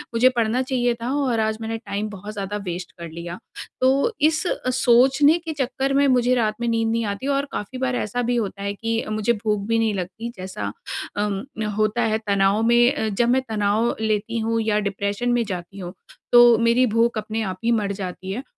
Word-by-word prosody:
मुझे 255 +3 +5
पढ़ना 230 +2 +1
चाहिए 245 -2 0
था 240 - -2
और 240 -4 0
आज 220 0 0
मैंने 225 0 -3
टाइम 215 -1 -4
बहुत 205 +1 -8
ज़्यादा 205 0 -4
वेस्ट 175 0 -5
कर 170 -1 -6
लिया। 170 +3 -7 0.4
तो 270 - +3
इस 310 +2 +2
अ, 255 - -2
सोचने 265 +5 +4
के 325 -2 -6
चक्कर 270 0 -1
में 280 0 +4
मुझे 250 -1 +3
रात 215 -3 +1
में 235 - -1
नींद 225 -1 +1
नहीं 230 -1 0
आती 205 +7 -4
और 280 - -1
काफ़ी 230 +5 -5
बार 260 -1 -1
ऐसा 245 +3 -2
भी 245 - +2
होता 200 -3 -3
है 200 0 -2
कि 225 +2 -2
अ, - - -8
मुझे 215 +2 +1
भूख 210 -1 -1
भी 230 0 +2
नहीं 220 -2 +1
लगती, 195 +5 -5
जैसा 185 0 -5 0.5
अ, - - +1 0.6
होता 215 +2 +1
है - - +3
तनाव 200 +1 +2
में 240 +2 +4
अ, 220 - -1
जब 235 +4 +1
मैं 260 +1 +3
तनाव 215 +2 +1
लेती 220 +1 -1
हूँ 225 +1 0
या 215 -1 +1
डिप्रेशन 200 +5 -2
में 240 -1 +2
जाती 185 0 -6
हूँ, 180 0 -7 0.4
तो 240 -1 +8
मेरी 235 +2 +3
भूख 230 0 +2
अपने 215 +1 -3
आप 185 -2 -4
ही 235 - +3
मर 200 -1 -2
जाती 185 +1 -6
है। 250 +7 -4
225 Hz, 215 wpm, -22 LUFS, 205-245 Hz, 0.6 s, तो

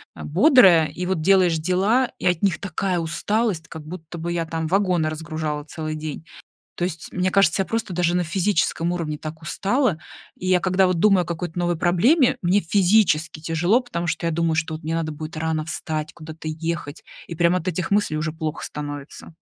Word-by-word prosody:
а, - - -8
бодрая. 185 - +6
И 180 - -5
вот 185 -4 -1
делаешь 180 -2 +4
дела, 195 +10 +1
и - - -6
от 180 +1 +1
них 195 -4 +2
такая 185 -1 -2
усталость, 180 +2 -1
как 160 -2 -9
будто 170 0 -8
бы 170 +1 -3
я, 165 -1 -1
там, 160 0 -3
вагоны 180 -4 +1
разгружала 155 -1 -4
целый 155 0 -5
день. 155 0 -6 0.5
То 175 - -1
есть, 165 -3 -6
мне 185 0 +1
кажется, 195 -1 +3
я - - -1
просто 225 -4 -3
даже 175 0 +1
на 180 - +2
физическом 170 -1 0
уровне 155 -4 -3
так 155 +1 -8
устала. 200 - 0 0.4
И 185 - -5
я 185 -1 +4
когда 185 0 +3
вот 180 -2 0
думаю 195 -3 +4
о - - -10
какой-то 175 0 -4
новой 175 -1 0
проблеме, 235 - +3
мне 185 +3 +2
физически 175 -4 +2
тяжело, 175 +9 +2
потому 175 -8 -4
что 170 - -2
я - - 0
думаю, 165 0 0
что 160 0 -1
от 155 - -10
мне 160 +1 -2
надо 160 -1 -2
будет 155 +1 -7
рано 160 -1 -1
встать, 155 -2 -4
куда-то 155 -1 -9
ехать. 155 -1 -4 0.2
И 170 - -6
прямо 170 +2 +3
от 180 - -6
этих 180 +1 -2
мыслей 200 -7 +1
уже 155 0 -2
плохо 160 -1 -4
становится. 145 +2 -7
170 Hz, 200 wpm, -23 LUFS, 160-185 Hz, 0.5 s, бодрая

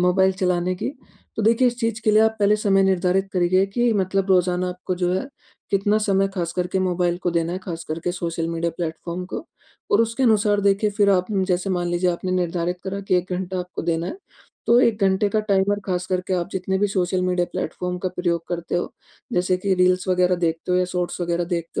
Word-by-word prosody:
Mobile 190 +1 +3
चलाने 180 0 +1
की, - - -3 0.5
तो 220 - -1
देखिए 230 +4 +4
इस 240 0 -5
चीज़ 230 -2 -1
के 215 - +4
लिए 215 +1 +5
आप 220 0 +2
पहले 205 +1 +4
समय 195 -2 +3
निर्धारित 190 0 +1
करिए 185 +1 +3
कि 240 +4 +1
मतलब 195 -1 0
रोज़ाना 180 0 +2
आपको 180 +1 -4
जो 180 0 0
है, 190 +8 -2 0.4
कितना 205 +2 +2
समय 195 -2 +2
खास 170 -2 -2
करके 180 +1 -1
मोबाइल 180 -1 0
को 175 - +1
देना 170 0 0
है, 185 - -3
खास 170 -3 -6
करके 165 +3 -2
सोशल 165 -2 -3
मीडिया 170 0 -1
प्लेटफॉर्म 170 +1 -4
को। - - -4 0.5
और 205 - +4
उसके 230 +3 -2
अनुसार 210 -3 +3
देखिए, 200 +1 +2
फिर 200 -1 +3
आप 185 -1 +2
न 195 -2 +1
जैसे 185 +1 -1
मान 175 -1 -1
लीजिए 175 +1 +1
आपने 185 +2 -3
निर्धारित 180 0 -1
करा 195 +1 -3
कि 195 -2 0
1 180 +1 -2
घंटा 185 0 -3
आपको 180 0 -6
देना 165 0 -1
है। 345 - -6 0.5
तो 235 +1 +5
1 225 -4 +2
घंटे 195 +1 +3
का 215 +2 +1
टाइमर 200 -1 +1
खास 180 -1 -2
करके 185 0 -2
आप 175 0 -1
जितने 190 +1 -1
भी 205 - +2
सोशल 185 -1 0
मीडिया 180 -1 +1
प्लेटफॉर्म 180 +3 -3
का 185 - -2
प्रयोग 170 -2 0
करते 170 -1 -3
हो, 175 - -3 0.4
जैसे 180 +1 +1
कि 190 0 +1
रील्स 180 0 +2
वग़ैरह 180 0 +3
देखते 165 +1 -1
हो 180 - +3
या 180 - +2
शॉट्स 180 0 -3
वग़ैरह 175 0 0
देखते 170 -1 -3
185 Hz, 220 wpm, -22 LUFS, 175-195 Hz, 0.5 s, लिए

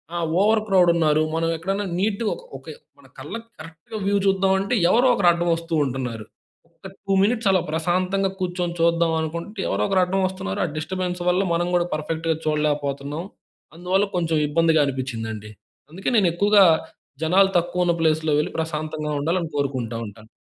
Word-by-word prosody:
ఆహ్, 170 -1 -1 0.2
over 215 +1 +4
crowd 185 -3 +4
ఉన్నారు. 155 -2 +2
మనం 165 0 0
ఎక్కడైనా 195 +4 -2
నీట్‌గా 210 +2 0 0.3
ఒక - - -19 0.3
మన - - -20
కళ్ళకి 230 0 -7
కరెక్ట్‌గా 165 +6 -9
వ్యూ 200 0 +2
చూద్దాం 190 0 +3
అంటే 200 +5 -2 0.2
ఎవరో 245 +6 +4
ఒకరు 200 -6 +2
అడ్డం 170 0 -1
వస్తూ 165 0 -7
ఉంటున్నారు. 125 -5 -4 0.4
ఒక్క 165 +3 -13 0.2
2 195 - 0
మినిట్స్ 225 -1 +1
అలా 185 -2 +3
ప్రశాంతంగా 185 +4 0
కూర్చొని 175 -1 -2
చూద్దాం 170 0 +2
అనుకుంటే, 170 +7 -5
ఎవరో 100 +1 -1
ఒకరు 190 -1 +2
అడ్డం 190 +2 0
వస్తున్నారు. 140 - -4
ఆహ్, 160 - -5
డిస్టర్బెన్స్ 180 +2 -3
వల్ల 180 +2 +2
మనం 175 +1 0
కూడా 175 0 +1
పర్ఫెక్ట్‌గా 160 +1 -2
చూడలేకపోతున్నాం. 150 0 -1 0.5
అందువల్ల 190 +3 +1
కొంచెం 165 -2 0
ఇబ్బందిగా 160 0 +3
అనిపించిందండి. 115 -5 -5 0.4
అందుకే 190 +8 -3
నేను 190 -4 +4
ఎక్కువగా 200 +2 +5 0.6
జనాలు 190 +4 +4
తక్కువ 180 +1 -1
ఉన్న 170 - +2
ప్లేస్‌లో 155 -1 +1
వెళ్లి 150 - -2
ప్రశాంతంగా 155 -1 -3
ఉండాలని 165 +2 -1
కోరుకుంటా 130 -5 -2
ఉంటాను. 110 +1 -14
170 Hz, 160 wpm, -23 LUFS, 155-190 Hz, 0.6 s, ఎక్కువగా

